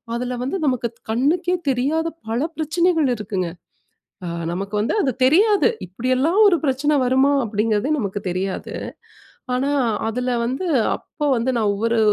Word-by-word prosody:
அதுல 250 0 -3
வந்து 320 +9 -2
நமக்கு 245 -3 0 0.2
கண்ணுக்கே 335 +9 +1 0.2
தெரியாத 300 +6 0 0.2
பல 235 +4 0 0.2
பிரச்சனைகள் 320 -1 +1
இருக்குங்க. 190 -4 -3 0.8
அ - - -3 0.2
நமக்கு 195 +3 -4
வந்து 220 - 0
அது 265 -6 +1
தெரியாது. 405 - +4 0.2
இப்பிடியெல்லாம் 255 - +1
ஒரு 350 - +4
பிரச்சனை 290 +2 +1
வருமா? 265 +3 +3
அப்பிடிங்கிறதே 215 +4 0
நமக்கு 200 -1 -3
தெரியாது. 185 +1 -3 0.8
ஆனா, 270 +3 0 0.4
அதுல 250 +2 -2 0.2
வந்து 265 +9 -2 0.3
அப்போ 295 - -6
வந்து, 235 +3 0
நான் 210 -3 +2
ஒவ்வொரு 230 +2 0
255 Hz, 135 wpm, -21 LUFS, 220-305 Hz, 0.8 s, தெரியாது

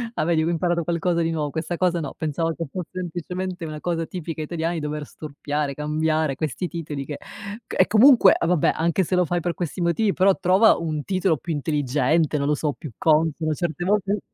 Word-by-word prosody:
Ah, - - 0
vedi 165 -1 +2
che 160 - 0
ho - - +1
imparato 170 0 0
qualcosa 170 +1 0
di 165 - 0
nuo 150 -3 -1
questa 160 +3 -3
cosa 175 -1 +1
no, 145 - -5
pensavo 165 +2 -1
che 165 - -4
fosse 180 -3 -5
semplicemente 180 +1 -4
una 155 -1 -6
cosa 165 -2 -1
tipica 165 -2 -6
italiani 165 +2 -2
dover 150 0 -4
storpiare, 145 -1 -4
cambiare 155 0 0
questi 155 +4 -3
titoli 155 -5 -5
che 145 +1 -6
c 205 +3 -9
e - - +5
comunque 230 -2 +7
e 170 - 0
vabbè 175 -4 +3
anche 170 +3 +1
se 185 - -1
lo 180 0 +3
fai 175 +1 -1
per 175 +1 -1
questi 175 +1 -4
motivi 190 +4 +1
però 190 +1 +3
trova 190 +5 +5
un 155 -3 -3
titolo 185 -2 +1
più 170 - -4
intelligente, 150 +1 +1
non 140 0 -1
lo 150 - +2
so, 150 0 -1
più 155 -6 -9
consono 155 0 +2
certe 170 +3 -3
volte 200 +1 +1
165 Hz, 210 wpm, -23 LUFS, 155-180 Hz, -, comunque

